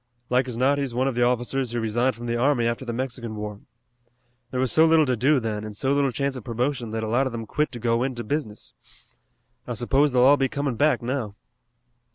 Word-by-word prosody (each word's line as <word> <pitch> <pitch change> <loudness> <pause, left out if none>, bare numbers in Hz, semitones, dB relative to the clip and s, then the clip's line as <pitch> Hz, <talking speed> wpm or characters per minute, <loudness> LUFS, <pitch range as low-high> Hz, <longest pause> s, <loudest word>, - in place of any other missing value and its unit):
"Like 125 +1 +2
as 120 -2 -4
not 140 +3 +2
he's 135 -4 -3
one 130 +2 +1
of 135 - 0
the 120 - -1
officers 125 +1 +1
who 120 - -1
resigned 120 +3 0
from 120 +1 -8
the 120 0 -1
army 120 0 +2
after 115 +2 -1
the 120 - -4
Mexican 120 -2 -4
War. 105 -1 -6 0.9
There 125 - -3
was 130 -1 +1
so 160 - +5
little 160 -1 +5
to 130 -2 +1
do 135 +5 +3
then, 110 -3 -3
and 105 -1 -7
so 135 +6 0
little 140 -2 +2
chance 140 +3 -2
of 125 - -7
promotion, 120 +1 -2
that 110 0 -3
a - - -2
lot 125 +5 +1
of - - -4
them 115 -1 -5
quit 150 +7 -1
to 120 - -6
go 115 0 +1
into 125 -2 -2
business. 110 -4 -4 0.9
I 120 - -3
suppose 135 +5 +2
they'll 125 -1 +3
all 140 +3 +6
be 135 -1 +1
coming 140 -2 -2
back 150 0 +2
now." 120 -5 -3
125 Hz, 235 wpm, -24 LUFS, 115-135 Hz, 0.9 s, all